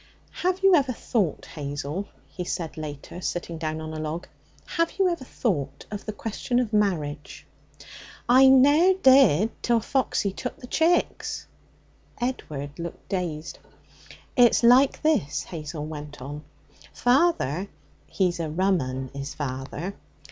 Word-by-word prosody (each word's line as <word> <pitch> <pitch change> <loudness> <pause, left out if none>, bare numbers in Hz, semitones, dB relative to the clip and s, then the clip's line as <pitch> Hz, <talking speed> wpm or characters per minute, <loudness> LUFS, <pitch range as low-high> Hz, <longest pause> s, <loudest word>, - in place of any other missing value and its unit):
'Have 370 +2 -1
you 390 -1 +7
ever 275 -6 +3
thought, 210 - -1
Hazel,' 145 +5 -5 0.2
he 180 - -6
said 170 -2 -4
later, 155 +3 -7
sitting 170 -2 -4
down 155 -1 -3
on 155 0 -6
a 155 - -5
log 155 +3 -4 0.4
'have 335 -2 0
you 385 -1 +4
ever 340 -6 -2
thought 145 - -2
of 205 0 -6
the - - -1
question 225 +3 -3
of 240 -3 0
marriage?' 155 -9 -1 0.8
'I 260 +2 +7
ne'er 285 +8 +6
did 260 - +5
till 235 -1 +2
Foxy 225 -5 0
took 250 - -5
the - - -10
chicks.' 325 +7 0 0.7
Edward 150 - -4
looked 170 0 -7
dazed. 165 -5 -3 0.8
'It's 245 -1 +5
like 255 +3 +5
this,' 305 - +1
Hazel 150 -2 -6
went 150 -1 -8
on. 145 +3 -7 0.5
'Father 245 - +2 0.4
(he's 180 -3 0
a 165 -2 -2
rum 185 +2 +2
'un, 130 0 -4
is 140 +1 -6
father!) 140 +6 -4
180 Hz, 135 wpm, -25 LUFS, 150-255 Hz, 0.8 s, you